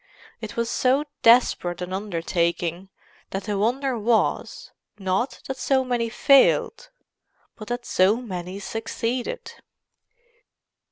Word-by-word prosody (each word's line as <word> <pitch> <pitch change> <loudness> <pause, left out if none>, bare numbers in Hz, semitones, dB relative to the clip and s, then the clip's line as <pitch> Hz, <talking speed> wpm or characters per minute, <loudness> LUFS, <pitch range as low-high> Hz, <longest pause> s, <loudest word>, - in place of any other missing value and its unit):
It - - -7
was 235 0 0
so 260 +4 +2 0.2
desperate 230 -7 +4
an 180 +1 -5
undertaking 175 -1 -2 0.4
that 195 - -4
the 210 -1 -2
wonder 245 +4 0
was, 225 +1 0 0.3
not 195 +6 -1
that 265 - -5
so 265 0 +1
many 240 -2 -1
failed, 295 - +3 0.7
but 215 - -10
that 240 0 -4
so 190 +3 +3
many 185 -6 -6
succeeded. 230 - -4
225 Hz, 110 wpm, -24 LUFS, 190-250 Hz, 0.7 s, desperate